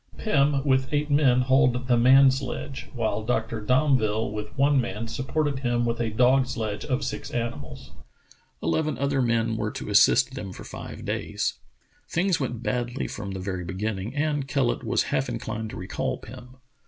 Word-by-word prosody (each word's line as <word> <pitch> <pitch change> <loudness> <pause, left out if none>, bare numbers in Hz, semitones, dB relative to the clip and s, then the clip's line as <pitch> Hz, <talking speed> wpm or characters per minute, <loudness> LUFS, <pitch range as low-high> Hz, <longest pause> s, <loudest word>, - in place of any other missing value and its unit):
Pim 145 -7 +2
with 130 -1 +2
eight 150 0 0
men 135 -4 +4
hauled 125 -1 +2
the 125 - +4
man 130 +3 +7
sledge, 135 +1 -5
while 110 -2 -1
Dr. 110 -1 -1
Domville 115 -4 +2
with 105 0 -4
one 140 0 +4
man 115 -1 -4
supported 140 +3 -1
him 120 -2 0
with 115 0 -1
a 115 - 0
dog 125 +4 +3
sledge 105 -4 -3
of 135 0 -1
six - - -4
animals. 115 -12 -5 0.7
Eleven 155 - 0
other 140 -1 +1
men 115 -2 +1
were 105 -1 -1
to - - -6
assist - - +5
them 95 -3 -6
for - - -10
five - - -8
days. - - -2 0.5
Things 180 +1 +1
went 120 -4 -3
badly 120 +1 -2
from 100 -2 -6
the 95 - -5
very 95 -1 -4
beginning, 100 - -4
and 145 -2 0
Kellet 135 -3 0
was - - +1
half - - +1
inclined 110 0 -4
to - - -8
recall 90 +2 -3
Pim. 125 +1 -12
125 Hz, 170 wpm, -26 LUFS, 110-135 Hz, 0.7 s, man